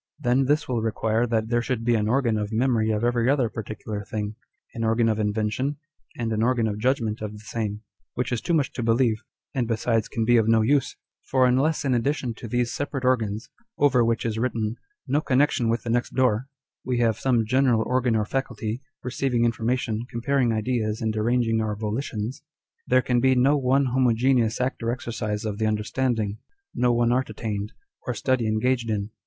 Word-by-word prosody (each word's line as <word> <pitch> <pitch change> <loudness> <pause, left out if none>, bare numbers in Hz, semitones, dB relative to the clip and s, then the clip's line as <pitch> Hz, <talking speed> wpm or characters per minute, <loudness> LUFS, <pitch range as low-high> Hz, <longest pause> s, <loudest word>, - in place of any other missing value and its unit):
Then 130 -1 +2
this 150 +3 +1
will 120 -3 -1
require 110 +1 0
that 110 -1 0
there 120 0 +2
should 120 -2 -2
be 120 - +3
an 105 -2 +1
organ 120 -1 +2
of 105 0 -2
memory 115 -1 +1
of 110 0 0
every 120 0 +2
other 135 -5 +2
particular 110 -1 -6
thing; 105 0 -4 0.4
an 115 - -4
organ 115 +1 +2
of 110 -1 +1
invention, 110 +7 -1 0.4
and 115 -2 -1
an 110 - 0
organ 120 -1 +2
of 105 -1 -2
judgment 115 -3 0
of 105 -1 -4
the - - -9
same; 110 -2 -3 0.3
which 125 +1 -2
is 120 - -1
too 170 - 0
much 145 -4 +1
to - - -4
believe, 115 -1 +2 0.3
and 125 -5 0
besides 115 -1 0
can 115 - -2
be 120 +1 +5
of 110 -1 +3
no 115 -1 +4
use: 140 +3 +1 0.3
for 130 -1 +4
unless 135 +5 +2
in 135 - +2
addition 125 0 0
to 115 - -9
these 120 +1 0
separate 140 -2 -3
organs, 110 -3 0 0.3
over 130 -4 +4
which 115 0 0
is 110 -1 -1
written 115 -3 -1
â€" - - -8 0.2
" 415 - -48
No 150 - +3
connection 130 -4 +2
with 115 +1 0
the 115 - -2
next 120 +1 -1
door" 125 -1 +2
â€" - - -49 0.3
we 125 -1 -1
have 115 -2 +1
some 120 -4 +2
general 125 -1 +3
organ 125 -2 +1
or 105 -1 +1
faculty, 120 -1 -3 0.2
receiving 125 -1 0
information, 115 0 -1
comparing 125 +1 +1
ideas, 110 -1 -1
and 110 -1 -1
arranging 115 0 +1
our 105 -1 -1
volitions, 110 +3 -3 0.5
there 130 0 +4
can 125 -1 +2
be 130 +1 +4
no 135 +4 +4
one 135 0 +2
homogeneous 125 -2 +2
act 125 +1 -1
or 115 - -1
exercise 110 -3 -3
of 105 -1 -3
the 110 - +1
under 105 0 0
standing, 110 -4 -1 0.3
no 125 -1 +2
one 120 0 +2
art 130 0 +1
attained, 105 -1 -4 0.3
or - - -1
study 130 -3 0
engaged 115 +2 0
in. 105 -1 -2
115 Hz, 205 wpm, -25 LUFS, 110-130 Hz, 0.5 s, be